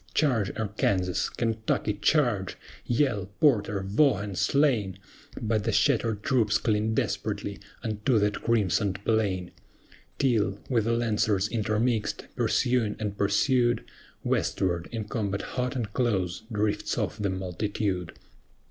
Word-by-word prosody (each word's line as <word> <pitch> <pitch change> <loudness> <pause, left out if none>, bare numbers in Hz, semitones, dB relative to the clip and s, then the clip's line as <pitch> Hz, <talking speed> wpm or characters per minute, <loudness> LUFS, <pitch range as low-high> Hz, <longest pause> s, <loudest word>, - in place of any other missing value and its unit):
Charge, 115 - +2
ARKANSAS! 100 -4 0
KENTUCKY, 110 -2 -1
charge! 120 - +2 0.3
YELL, 120 -6 +1
PORTER, 105 -9 +3
VAUGHAN, 105 -1 +2
are - - -6
slain. 105 -3 +2 0.4
But 110 -2 0
the - - 0
shattered 110 -3 +2
troops 120 -7 +2
cling 110 0 0
desperately 100 -2 -2 0.2
unto 110 +2 +1
that 105 0 +1
crimsoned 100 -3 +1
plain; 100 -5 0 0.7
Till, 110 -7 +1
with 115 -4 +2
the 115 - +1
Lancers 110 -4 +1
intermixed, 110 0 0
pursuing 120 -4 +1
and 105 -2 -3
pursued, 120 +4 +2 0.4
Westward, 85 -2 0
in 115 -2 -3
combat 105 -3 -2
hot 125 0 -1
and 110 -5 -3
close, 95 -7 0
drifts 105 -1 -1
off 105 - -2
the 100 -1 0
multitude. 95 -1 -2
105 Hz, 120 wpm, -27 LUFS, 100-115 Hz, 0.7 s, PORTER